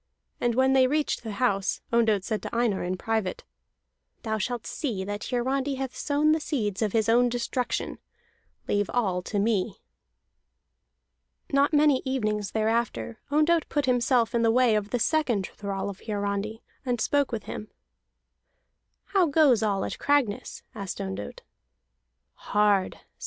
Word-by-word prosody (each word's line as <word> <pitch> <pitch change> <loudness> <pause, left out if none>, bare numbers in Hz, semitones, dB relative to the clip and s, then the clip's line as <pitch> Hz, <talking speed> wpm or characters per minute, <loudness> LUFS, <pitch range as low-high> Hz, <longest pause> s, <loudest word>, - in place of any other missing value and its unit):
And 240 -1 +1
when 265 +1 +4
they 260 -1 +5
reached 300 +2 0
the 220 -3 -6
house, 200 -3 0
Ondott 220 -4 +3
said 215 +1 -2
to - - -6
Einar 230 -5 +1
in 180 +1 -2
private: 220 -3 -2 0.8
"Thou 220 -2 -1
shalt 240 +2 -3
see 225 -10 -3
that 205 +2 -4
Hiarandi 265 +3 0
hath 265 -1 -4
sown 295 +1 +2
the 315 - +3
seeds 220 - -2
of 215 -2 +1
his 220 0 +1
own 240 +2 +4
destruction. 245 +1 -2 0.7
Leave 205 0 +1
all 190 -7 +1
to 205 - -4
me." 205 -2 0 1.7
Not 280 +2 +4
many 295 -3 +4
evenings 215 -6 -1
thereafter, 225 +1 -1
Ondott 310 +3 +2
put 290 -2 0
himself 245 -2 +2
in 235 - +2
the 230 - +4
way 245 0 +4
of 210 -1 0
the 245 - 0
second 240 -7 +1
thrall 200 -1 -4
of 200 -2 -6
Hiarandi, 205 +1 -3 0.2
and 245 -3 -1
spoke 285 +4 +1
with 225 -3 -3
him. 215 - -6 1.5
"How 380 -4 +4
goes 280 -6 +4
all 200 -3 0
at - - -5
Cragness?" 280 -8 0
asked 200 -3 -6
Ondott. 95 +1 -5
230 Hz, 145 wpm, -27 LUFS, 205-265 Hz, 1.7 s, they